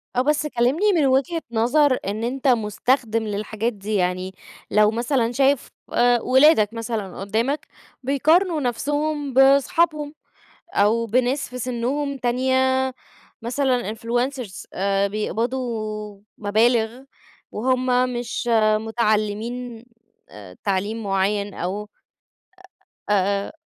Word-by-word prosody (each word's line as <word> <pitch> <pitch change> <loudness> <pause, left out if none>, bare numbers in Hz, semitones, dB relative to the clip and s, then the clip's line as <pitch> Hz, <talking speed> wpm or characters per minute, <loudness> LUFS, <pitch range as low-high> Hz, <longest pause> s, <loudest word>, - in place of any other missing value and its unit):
آه. 250 - +3
بس 300 +2 +1
كلّمني 300 - +2
من 305 - +3
وجهة 275 +6 +1
نظر 255 +4 +3
إن 215 +3 -3
أنت 260 +3 -2
مُستخدِم 230 0 +1
للحاجات 215 +2 -3
دي. 205 +1 -4
يعني 185 0 -1 0.4
لو 210 0 +4
مثلًا 235 +1 0
شايف 270 +1 +2 0.2
وأ 240 -1 +2
ولادك 255 -5 +4
مثلًا 225 -4 -4
قدّامك 225 +9 -1 0.4
بيقارنوا 310 +5 +2
نفسهم 290 +3 -2
باصحابهم 290 +3 +3 0.6
أو 220 +3 +2
بناس 250 +5 0
في 250 - -7
سِنّهم 260 +4 -2
تانية 260 +1 +1 0.5
مثلًا 245 -2 0
influencers 240 -2 -3
آآ 195 +1 +1
بيقبضوا 215 -1 -3 0.2
مبالغ 225 +3 +1 0.5
وهم 255 +1 +1
مش 240 0 -3 0.3
متعلّمين 225 +2 -2 0.4
أ 100 -3 -12
تعليم 205 +3 -1
معيّن 200 +1 0
أو 190 +4 -3 1.3
أ - - +4
آآ 200 0 0
240 Hz, 105 wpm, -22 LUFS, 215-265 Hz, 1.3 s, لو